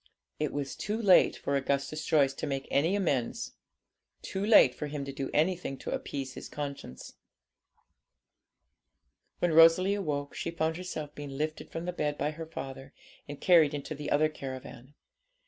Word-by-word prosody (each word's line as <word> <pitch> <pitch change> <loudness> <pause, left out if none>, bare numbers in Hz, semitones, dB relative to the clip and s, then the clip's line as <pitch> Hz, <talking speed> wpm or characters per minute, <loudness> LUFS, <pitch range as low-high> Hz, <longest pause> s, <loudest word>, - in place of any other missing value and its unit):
It 150 -1 0
was 140 -1 -4
too 215 +2 -3
late 195 -5 +5
for 140 - -2
Augustus 140 +3 -1
Joyce 140 -4 +3
to 150 - -5
make 135 -1 -3
any 165 +8 +2
amends; 145 -12 -1 0.7
too 190 - -3
late 205 - +7
for 150 - -5
him 145 -1 -4
to 140 - -6
do 135 0 -4
anything 165 -3 0
to - - -6
appease 135 -2 -4
his - - -9
conscience. 140 - -7 2.2
When 175 -2 +1
Rosalie 165 +4 +7
awoke, 150 -8 -2
she - - -3
found 160 -1 -1
herself 155 -5 -6
being 145 -1 -7
lifted 155 +1 -3
from 165 +1 -5
the 180 - -3
bed 150 -3 -1
by 145 +2 -1
her 160 +1 -7
father, 135 -3 -8 0.3
and 145 -1 -7
carried 160 -5 +5
into 145 +2 -5
the 150 0 -5
other 155 +2 +4
caravan. 135 -2 -9
150 Hz, 165 wpm, -30 LUFS, 140-165 Hz, 2.2 s, late